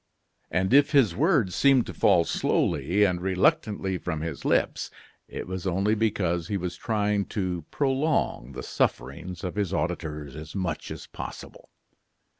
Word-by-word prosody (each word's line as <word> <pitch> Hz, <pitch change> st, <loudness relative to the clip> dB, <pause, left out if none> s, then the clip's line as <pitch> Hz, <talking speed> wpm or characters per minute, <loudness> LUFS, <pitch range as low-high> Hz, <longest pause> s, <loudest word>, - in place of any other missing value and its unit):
And 95 Hz, +5 st, 0 dB
if 145 Hz, +2 st, +5 dB
his 120 Hz, -12 st, +4 dB
words 135 Hz, -, +2 dB
seemed 135 Hz, -4 st, +4 dB
to -, -, -7 dB
fall 90 Hz, -4 st, +4 dB
slowly 85 Hz, +10 st, +1 dB
and 90 Hz, -3 st, +1 dB
reluctantly 95 Hz, -, +1 dB
from 80 Hz, -1 st, -3 dB
his 80 Hz, -3 st, -5 dB
lips, -, -, +1 dB, 0.4 s
it -, -, -6 dB
was 95 Hz, +1 st, -4 dB
only 95 Hz, +4 st, +1 dB
because 95 Hz, -6 st, 0 dB
he 100 Hz, -, -1 dB
was 90 Hz, -1 st, -4 dB
trying 105 Hz, -2 st, 0 dB
to 90 Hz, -5 st, -3 dB
prolong 135 Hz, -, 0 dB
the -, -, -6 dB
sufferings 80 Hz, +8 st, -2 dB
of 90 Hz, -, -3 dB
his 100 Hz, -2 st, -1 dB
auditors 75 Hz, -3 st, -3 dB
as 75 Hz, +2 st, -9 dB
much 90 Hz, -5 st, -3 dB
as -, -, -7 dB
possible. -, -, -9 dB
95 Hz, 150 wpm, -26 LUFS, 85-110 Hz, 0.4 s, if